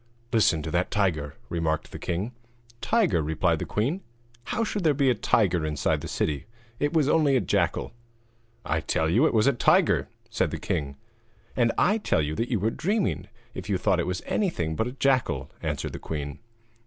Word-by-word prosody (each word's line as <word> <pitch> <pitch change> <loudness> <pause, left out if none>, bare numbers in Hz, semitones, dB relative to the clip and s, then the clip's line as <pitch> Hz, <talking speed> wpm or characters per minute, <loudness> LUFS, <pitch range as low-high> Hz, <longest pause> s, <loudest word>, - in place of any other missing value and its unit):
'Listen 85 -8 +3
to 80 - -4
that 90 +2 +1
tiger!' 80 -8 0
remarked 80 -2 -1
the - - -7
king. 95 +6 -2 0.5
'Tiger?' 215 - +2
replied 75 +1 +1
the - - -4
queen. 140 - -1 0.4
'How 230 - -1
should 210 -3 -2
there 155 -3 +3
be 135 -2 +3
a - - +4
tiger 95 -6 +2
inside 75 -2 0
the - - -5
city? 75 +2 -2 0.3
It 145 - +1
was 155 -4 +2
only 150 -3 +3
a - - +4
jackal.' 90 -5 0 0.7
'I 80 - 0
tell 80 +1 0
you 115 - +4
it - - -1
was 110 0 +4
a 140 - +4
tiger,' 120 - +3 0.2
said - - +1
the - - -4
king. 70 -1 -2 0.6
'And 120 -2 +3
I 210 +4 +3
tell 80 - +1
you 75 +1 -2
that 115 +9 -2
you 115 -5 +1
were 110 +4 +1
dreaming 200 - -1 0.3
if 95 +2 -7
you 100 - +2
thought 95 -1 +2
it 85 - -1
was 90 -1 -3
anything 85 - -1
but 110 - 0
a 125 - -5
jackal,' 135 -2 +1
answered - - -3
the - - -6
queen. 75 -2 -5
105 Hz, 195 wpm, -26 LUFS, -, 0.7 s, a